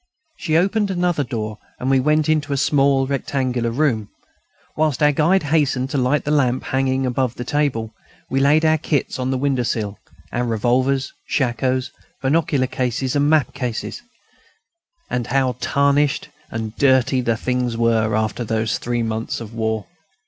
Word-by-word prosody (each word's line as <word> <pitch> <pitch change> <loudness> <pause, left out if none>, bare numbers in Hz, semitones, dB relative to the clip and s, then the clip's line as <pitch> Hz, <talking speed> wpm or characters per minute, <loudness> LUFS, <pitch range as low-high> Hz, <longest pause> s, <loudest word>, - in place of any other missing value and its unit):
She 160 -1 +1
opened 200 +4 +1
another 175 -5 0
door, 110 -4 -4 0.2
and 125 - -3
we 135 0 +4
went 150 +3 +2
into 155 -2 +1
a - - 0
small 135 -1 +3
rectangular 130 -3 -1
room. 115 -5 0 0.7
Whilst 155 -3 +1
our 150 - +6
guide 165 +6 +2
hastened 140 -3 +1
to 140 - 0
light 130 +4 +1
the 150 - 0
lamp 130 -4 +2
hanging 130 0 0
above 125 -1 -1
the 125 - -5
table, 125 -6 -1 0.3
we 135 - 0
laid 150 +4 +4
our 155 0 +3
kits 145 -3 -1
on 130 0 -1
the 130 - 0
window 135 -1 +1
sill: 105 -4 -2 0.3
our 120 - -1
revolvers, 125 +4 +1
shakoes, 130 -1 0 0.3
binocular 140 -1 +1
glasses 130 +1 -2
and 145 0 +3
map 155 -5 +2
cases; 125 - -4 1.1
and 120 -2 -2
how 130 -1 +1
tarnished 140 0 +1 0.2
and 110 0 -5
dirty 130 -1 +3
the 115 -2 0
things 125 -1 -1
were, 115 -2 +2
after 110 +2 -1
those 110 0 -1
three 120 -1 -1
months 110 0 -3
of 115 -1 -9
war! 110 -1 -2
130 Hz, 160 wpm, -21 LUFS, 120-145 Hz, 1.1 s, our